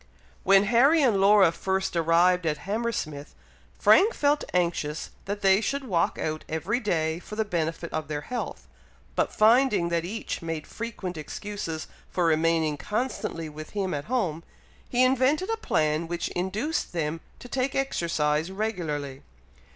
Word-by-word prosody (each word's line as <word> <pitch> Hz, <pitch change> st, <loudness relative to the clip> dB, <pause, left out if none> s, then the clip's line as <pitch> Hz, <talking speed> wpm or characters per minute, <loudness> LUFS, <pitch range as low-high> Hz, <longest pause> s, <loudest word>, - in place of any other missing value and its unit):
When 195 Hz, 0 st, +5 dB
Harry 265 Hz, +9 st, +4 dB
and 215 Hz, -7 st, +3 dB
Laura 200 Hz, -3 st, +6 dB
first 190 Hz, +2 st, -2 dB
arrived 170 Hz, +1 st, +3 dB
at 150 Hz, -1 st, 0 dB
Hammersmith, 200 Hz, -9 st, -3 dB, 0.4 s
Frank 430 Hz, +5 st, +5 dB
felt 290 Hz, 0 st, +2 dB
anxious 170 Hz, -4 st, -1 dB
that 205 Hz, +1 st, -4 dB
they 195 Hz, +1 st, +5 dB
should 280 Hz, +4 st, -2 dB
walk 180 Hz, -9 st, 0 dB
out 155 Hz, 0 st, -3 dB
every 175 Hz, +9 st, -1 dB
day 160 Hz, -7 st, 0 dB
for 210 Hz, -, -9 dB
the 220 Hz, 0 st, 0 dB
benefit 165 Hz, -3 st, -3 dB
of 155 Hz, -2 st, -2 dB
their 145 Hz, -1 st, -3 dB
health; 245 Hz, +9 st, -5 dB, 0.5 s
but -, -, +1 dB
finding 215 Hz, -5 st, +4 dB
that 170 Hz, -1 st, 0 dB
each 210 Hz, +6 st, -4 dB
made 165 Hz, -2 st, -4 dB
frequent 205 Hz, -6 st, -6 dB
excuses 165 Hz, +1 st, -5 dB, 0.2 s
for 180 Hz, -, 0 dB
remaining 160 Hz, -1 st, +2 dB
constantly 210 Hz, -, -3 dB
with 155 Hz, 0 st, -9 dB
him 190 Hz, -2 st, -1 dB
at 145 Hz, -1 st, -3 dB
home, 185 Hz, -10 st, -1 dB, 0.5 s
he 250 Hz, +1 st, +3 dB
invented 265 Hz, -, +2 dB
a 450 Hz, -, 0 dB
plan 155 Hz, -, 0 dB
which 170 Hz, 0 st, -3 dB
induced 205 Hz, -, -2 dB
them 165 Hz, -1 st, -2 dB, 0.2 s
to -, -, -11 dB
take 265 Hz, +2 st, -1 dB
exercise 165 Hz, -, 0 dB
regularly. 160 Hz, -10 st, -3 dB
180 Hz, 150 wpm, -26 LUFS, 160-225 Hz, 0.5 s, Laura